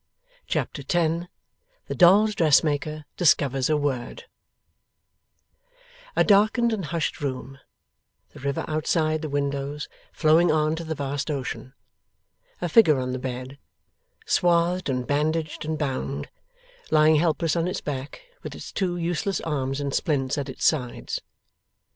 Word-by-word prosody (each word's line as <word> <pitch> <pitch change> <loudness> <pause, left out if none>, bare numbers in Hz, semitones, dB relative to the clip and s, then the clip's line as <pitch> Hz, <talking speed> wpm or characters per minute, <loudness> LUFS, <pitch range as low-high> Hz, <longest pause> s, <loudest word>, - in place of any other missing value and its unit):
Chapter - - -2
10 170 0 0 0.6
THE - - -4
DOLLS' 200 +5 +6
DRESSMAKER 155 -2 +2
DISCOVERS 135 -6 +3
A 155 - +3
WORD 140 -4 -3 1.9
A - - +4
darkened 215 +3 +4
and 195 -6 -3
hushed 165 -1 -2
room; 135 0 -4 0.7
the - - -13
river 140 +1 -2
outside 155 0 0
the 155 - -4
windows 140 +1 -2 0.2
flowing 160 +2 +4
on 155 0 +2
to 165 - -5
the 160 -1 -4
vast 140 0 -3
ocean; 135 -2 -4 0.9
a 175 - 0
figure 160 -4 +5
on 130 0 -2
the 130 - -3
bed, 130 +1 -6 0.7
swathed 175 0 +2
and 125 -1 -1
bandaged 155 +2 -1
and 155 0 -2
bound, 135 -1 -3 0.6
lying 155 0 +5
helpless 165 0 +1
on 170 0 0
its 185 - -2
back, 140 - -6 0.2
with - - -7
its - - -9
two 180 -3 -1
useless 175 +3 -1
arms 135 -3 -2
in 140 -1 -2
splints 135 -3 0
at 140 -1 -4
its 130 - -4
sides. 125 -6 0
155 Hz, 135 wpm, -25 LUFS, 140-170 Hz, 1.9 s, DOLLS